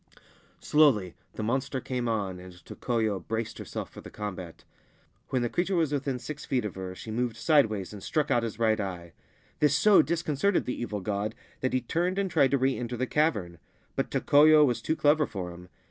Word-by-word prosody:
Slowly 125 Hz, -, +3 dB, 0.2 s
the 110 Hz, -, -5 dB
monster 130 Hz, +4 st, -1 dB
came 125 Hz, -1 st, -3 dB
on, 100 Hz, -5 st, -2 dB
and 90 Hz, 0 st, -11 dB
Tokoyo 110 Hz, -5 st, -1 dB
braced 110 Hz, +5 st, -4 dB
herself -, -, -6 dB
for -, -, -11 dB
the -, -, -10 dB
combat. 95 Hz, -5 st, -7 dB, 0.7 s
When 130 Hz, -2 st, 0 dB
the -, -, +1 dB
creature 185 Hz, +6 st, 0 dB
was 160 Hz, -4 st, +1 dB
within 135 Hz, -2 st, -1 dB
six 145 Hz, +5 st, -7 dB
feet 125 Hz, -4 st, -1 dB
of 105 Hz, -, -4 dB
her, 95 Hz, -1 st, -6 dB
she 110 Hz, -, -8 dB
moved 120 Hz, 0 st, -2 dB
sideways 115 Hz, -, +2 dB
and 100 Hz, -, -9 dB
struck 155 Hz, +6 st, -1 dB
out 120 Hz, -, +3 dB
his 115 Hz, -2 st, -4 dB
right 110 Hz, -1 st, +2 dB
eye. 90 Hz, -4 st, -5 dB, 0.5 s
This 150 Hz, -1 st, +4 dB
so 210 Hz, -2 st, +6 dB
disconcerted 165 Hz, +4 st, 0 dB
the 125 Hz, -, -4 dB
evil 105 Hz, -4 st, -3 dB
god 105 Hz, +3 st, -2 dB, 0.2 s
that 130 Hz, -, -1 dB
he 130 Hz, -, +2 dB
turned 175 Hz, +9 st, -1 dB
and 195 Hz, -2 st, 0 dB
tried 145 Hz, -5 st, +4 dB
to 140 Hz, -, +2 dB
re 130 Hz, 0 st, +1 dB
enter 120 Hz, 0 st, -4 dB
the 130 Hz, -, 0 dB
cavern; 105 Hz, -, 0 dB, 0.4 s
but -, -, -1 dB
Tokoyo 150 Hz, +1 st, +6 dB
was 125 Hz, -4 st, 0 dB
too 160 Hz, -, 0 dB
clever 150 Hz, 0 st, +3 dB
for 90 Hz, -3 st, -5 dB
him. 90 Hz, +1 st, -12 dB
120 Hz, 200 wpm, -28 LUFS, 105-145 Hz, 0.7 s, so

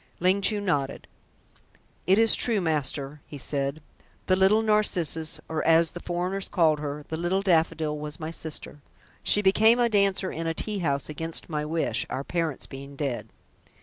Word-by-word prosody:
Ling 185 Hz, +3 st, +2 dB
Chu 210 Hz, +1 st, +2 dB
nodded. 145 Hz, -9 st, -2 dB, 1.0 s
"It 190 Hz, +2 st, +5 dB
is 225 Hz, 0 st, +4 dB
true, 230 Hz, -4 st, +2 dB
master," 150 Hz, -3 st, -1 dB
he 145 Hz, -, -8 dB
said. 140 Hz, +2 st, -3 dB, 0.4 s
"The 185 Hz, -, +3 dB
Little 195 Hz, +4 st, +4 dB
Narcissus, 180 Hz, -7 st, +1 dB
or 160 Hz, -1 st, -2 dB
as 165 Hz, 0 st, +4 dB
the 175 Hz, -, -8 dB
foreigners 180 Hz, +3 st, -3 dB
called 160 Hz, -4 st, +3 dB
her, 145 Hz, 0 st, -5 dB
the 160 Hz, -, -3 dB
Little 180 Hz, +4 st, 0 dB
Daffodil, 160 Hz, -4 st, +1 dB
was 150 Hz, +2 st, -5 dB
my 160 Hz, 0 st, -5 dB
sister. 155 Hz, -2 st, -6 dB, 0.4 s
She 205 Hz, -, +4 dB
became 220 Hz, +5 st, +5 dB
a 240 Hz, -1 st, +3 dB
dancer 200 Hz, -3 st, +2 dB
in 165 Hz, +1 st, -4 dB
a 165 Hz, -, -1 dB
tea 210 Hz, +2 st, -2 dB
house 140 Hz, -5 st, -1 dB
against 160 Hz, +3 st, -2 dB
my 150 Hz, -1 st, -1 dB
wish, 160 Hz, +1 st, -1 dB
our 135 Hz, -, -3 dB
parents 165 Hz, -2 st, -2 dB
being 140 Hz, +1 st, -10 dB
dead. 135 Hz, -4 st, -3 dB
165 Hz, 170 wpm, -26 LUFS, 150-190 Hz, 1.0 s, It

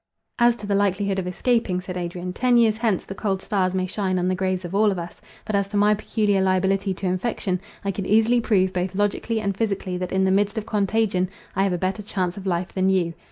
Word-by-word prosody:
"As 240 Hz, 0 st, +5 dB
to 210 Hz, -, -9 dB
the 205 Hz, -, -1 dB
likelihood 200 Hz, 0 st, +1 dB
of 180 Hz, -, -3 dB
escaping," 200 Hz, -1 st, 0 dB
said 180 Hz, 0 st, -7 dB
Adrian, 180 Hz, 0 st, -4 dB
"ten 250 Hz, +3 st, +3 dB
years 225 Hz, -2 st, +4 dB
hence 220 Hz, -5 st, 0 dB
the -, -, -6 dB
cold 195 Hz, -1 st, -1 dB
stars 190 Hz, -2 st, 0 dB
may 185 Hz, 0 st, 0 dB
shine 190 Hz, 0 st, -1 dB
on 180 Hz, 0 st, 0 dB
the 185 Hz, -, +1 dB
graves 185 Hz, 0 st, -1 dB
of 175 Hz, -, -7 dB
all 210 Hz, +1 st, +4 dB
of 190 Hz, -, -3 dB
us; 170 Hz, 0 st, -7 dB, 0.2 s
but 215 Hz, -, -4 dB
as 200 Hz, -1 st, +1 dB
to 205 Hz, +1 st, -3 dB
my 205 Hz, +1 st, +5 dB
peculiar 210 Hz, -1 st, 0 dB
liability 190 Hz, +1 st, +1 dB
to 195 Hz, -, -6 dB
infection, 185 Hz, 0 st, -1 dB, 0.2 s
I 200 Hz, -, +1 dB
could 195 Hz, 0 st, -4 dB
easily 225 Hz, +3 st, +4 dB
prove, 190 Hz, -5 st, +2 dB
both 180 Hz, +1 st, -2 dB
logically 205 Hz, +3 st, 0 dB
and 200 Hz, -2 st, -2 dB
physically, 195 Hz, -4 st, -2 dB
that 180 Hz, 0 st, -4 dB
in 190 Hz, 0 st, +2 dB
the 190 Hz, -, +3 dB
midst 205 Hz, +3 st, +1 dB
of 215 Hz, -, -2 dB
contagion 205 Hz, -3 st, +1 dB, 0.3 s
I 195 Hz, -, +1 dB
have 195 Hz, -, 0 dB
a -, -, 0 dB
better 190 Hz, +4 st, -2 dB
chance 185 Hz, -4 st, -2 dB
of 195 Hz, -1 st, -7 dB
life 175 Hz, 0 st, -1 dB
than 190 Hz, 0 st, +2 dB
you. 180 Hz, -3 st, +1 dB
195 Hz, 245 wpm, -23 LUFS, 185-210 Hz, 0.3 s, As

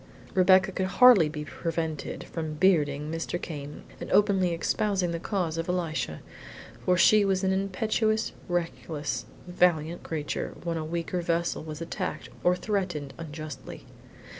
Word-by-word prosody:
Rebecca 190 Hz, +1 st, +5 dB
could 190 Hz, 0 st, -1 dB
hardly 200 Hz, -5 st, +7 dB
be 150 Hz, 0 st, -5 dB
prevented 160 Hz, -2 st, -3 dB
from 160 Hz, -2 st, -5 dB
bearding 150 Hz, -4 st, +2 dB
Mr. 165 Hz, +2 st, -3 dB
Came 145 Hz, -4 st, -7 dB, 0.2 s
and -, -, -7 dB
openly 195 Hz, -4 st, +4 dB
espousing 185 Hz, +2 st, 0 dB
the 170 Hz, -, -3 dB
cause 170 Hz, -4 st, -2 dB
of 165 Hz, -, -3 dB
Elisha, 165 Hz, -, -2 dB, 0.6 s
for 180 Hz, 0 st, +3 dB
she 210 Hz, +4 st, +6 dB
was 195 Hz, -1 st, +1 dB
an 190 Hz, -, +2 dB
impetuous, 215 Hz, +3 st, 0 dB, 0.2 s
reckless, 165 Hz, -3 st, -3 dB, 0.2 s
valiant 175 Hz, -2 st, +1 dB
creature 150 Hz, -3 st, -4 dB
when 170 Hz, -1 st, -2 dB
a 160 Hz, -, -2 dB
weaker 170 Hz, +2 st, -2 dB
vessel 170 Hz, 0 st, 0 dB
was 155 Hz, 0 st, -7 dB
attacked 165 Hz, -1 st, -4 dB
or 180 Hz, 0 st, +4 dB
threatened 180 Hz, -8 st, -2 dB
unjustly. 155 Hz, -4 st, -8 dB
170 Hz, 140 wpm, -28 LUFS, 155-190 Hz, 0.6 s, hardly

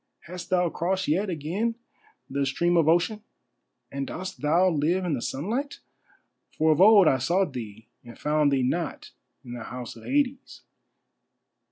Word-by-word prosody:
Hast 180 Hz, +1 st, -9 dB
thou 180 Hz, -1 st, +2 dB
crossed 190 Hz, +2 st, -1 dB
yet 190 Hz, +7 st, +1 dB
again 180 Hz, +8 st, -2 dB, 0.5 s
the 140 Hz, +1 st, -2 dB
stream 170 Hz, +6 st, +1 dB
of 165 Hz, -3 st, +3 dB
Ocean, 175 Hz, +6 st, +2 dB, 0.7 s
and 140 Hz, 0 st, -4 dB
dost 185 Hz, +2 st, -7 dB
thou 165 Hz, +5 st, +3 dB
live 175 Hz, +3 st, +1 dB
in 170 Hz, -, -1 dB
the 125 Hz, -, -2 dB
sunlight? 230 Hz, -, -3 dB, 0.8 s
For 160 Hz, 0 st, +3 dB
of 155 Hz, -, +2 dB
old 205 Hz, -3 st, +7 dB
I 130 Hz, -, +3 dB
sought 175 Hz, +4 st, 0 dB
thee 110 Hz, -3 st, -8 dB, 0.2 s
and 120 Hz, -1 st, -12 dB
found 150 Hz, -1 st, +1 dB
thee 135 Hz, -2 st, +1 dB
not 165 Hz, +7 st, -3 dB, 0.3 s
in 120 Hz, -, -8 dB
the 120 Hz, -2 st, -7 dB
House 125 Hz, -1 st, -7 dB
of 115 Hz, -, -13 dB
Hades?" 275 Hz, -1 st, -1 dB
165 Hz, 160 wpm, -26 LUFS, 140-185 Hz, 0.8 s, old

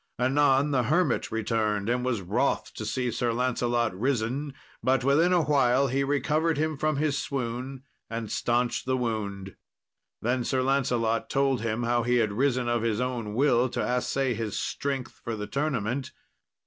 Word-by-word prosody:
Anon 135 Hz, +2 st, +3 dB
the 130 Hz, -3 st, +2 dB
hermit 155 Hz, +1 st, +1 dB
returned 110 Hz, -2 st, 0 dB
and 125 Hz, +1 st, 0 dB
was 120 Hz, -5 st, -1 dB
wroth 85 Hz, -, 0 dB
to -, -, -5 dB
see 125 Hz, -2 st, -1 dB
Sir 120 Hz, +1 st, 0 dB
Lancelot 120 Hz, -2 st, 0 dB
risen, 130 Hz, +5 st, -1 dB, 0.3 s
but 130 Hz, -1 st, +2 dB
within 150 Hz, +7 st, +4 dB
a 175 Hz, -2 st, +4 dB
while 135 Hz, -2 st, +3 dB
he 135 Hz, +2 st, +1 dB
recovered 145 Hz, +3 st, +1 dB
him 155 Hz, +1 st, 0 dB
from 155 Hz, +2 st, 0 dB
his 145 Hz, 0 st, 0 dB
swoon 130 Hz, 0 st, -4 dB, 0.3 s
and 115 Hz, -2 st, -4 dB
staunched 120 Hz, +1 st, 0 dB
the 130 Hz, 0 st, +1 dB
wound. 100 Hz, -5 st, -3 dB, 0.6 s
Then 120 Hz, +2 st, 0 dB
Sir 130 Hz, +1 st, 0 dB
Lancelot 125 Hz, -4 st, +1 dB
told 135 Hz, -4 st, +1 dB
him 115 Hz, +1 st, -1 dB
how 120 Hz, 0 st, +2 dB
he 120 Hz, +1 st, +1 dB
had 110 Hz, -4 st, +2 dB
risen 125 Hz, +1 st, +1 dB
of 120 Hz, -1 st, +1 dB
his 115 Hz, -1 st, 0 dB
own 120 Hz, -4 st, -3 dB
will 125 Hz, -1 st, +3 dB
to -, -, -2 dB
assay 125 Hz, +1 st, 0 dB
his 110 Hz, -2 st, -3 dB
strength 135 Hz, -3 st, -3 dB
for 115 Hz, -, -3 dB
the 105 Hz, -1 st, -4 dB
tournament. 135 Hz, -2 st, -2 dB
125 Hz, 165 wpm, -27 LUFS, 115-140 Hz, 0.6 s, within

